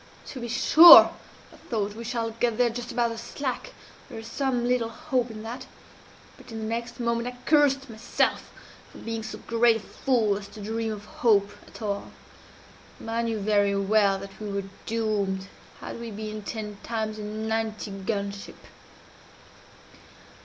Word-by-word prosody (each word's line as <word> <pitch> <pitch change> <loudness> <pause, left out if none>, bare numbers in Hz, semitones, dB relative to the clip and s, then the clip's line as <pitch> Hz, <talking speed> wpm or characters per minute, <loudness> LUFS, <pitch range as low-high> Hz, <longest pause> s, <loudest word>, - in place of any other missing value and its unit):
'To 265 - -8
be 240 - -5
sure,' 325 +8 +9 0.4
I - - -15
thought, 210 -3 -1
'we 230 +2 -8
shall 230 -1 -2
get 230 0 -1
there 245 -1 +3
just 245 +1 -6
about 235 -1 +1
the 230 - -6
slack 260 - -4 0.4
there 240 - -8
is 225 - -8
some 245 0 -1
little 245 -2 +1
hope 255 -2 -2
in 215 -1 -8
that 250 +4 -7 0.7
but - - -14
in 225 - -6
the 220 - -4
next 235 +3 -4
moment 235 0 -1
I 250 0 -6
cursed 280 -3 +3
myself 220 -2 -1 0.4
for - - -13
being 225 0 -4
so 220 - -7
great 230 0 +3
a - - -2
fool 220 -3 0
as 200 - -10
to 215 - -13
dream 220 +2 -3
of 210 -1 -7
hope 205 -3 +2 0.2
at - - -11
all. 200 -1 -3 1.0
I 230 +1 -1
knew 230 -1 -1
very 205 -1 +2
well 200 0 +3
that 195 0 -10
we 210 - -4
were 200 0 -2 0.2
doomed, 205 -4 -1 0.3
had - - -7
we 235 0 -6
been 215 0 -6
ten 210 -1 -6
times 220 -2 -3
a - - -5
ninety 220 0 -3
gun 200 +1 -3
ship. 200 0 -10
225 Hz, 170 wpm, -26 LUFS, 210-235 Hz, 1.0 s, sure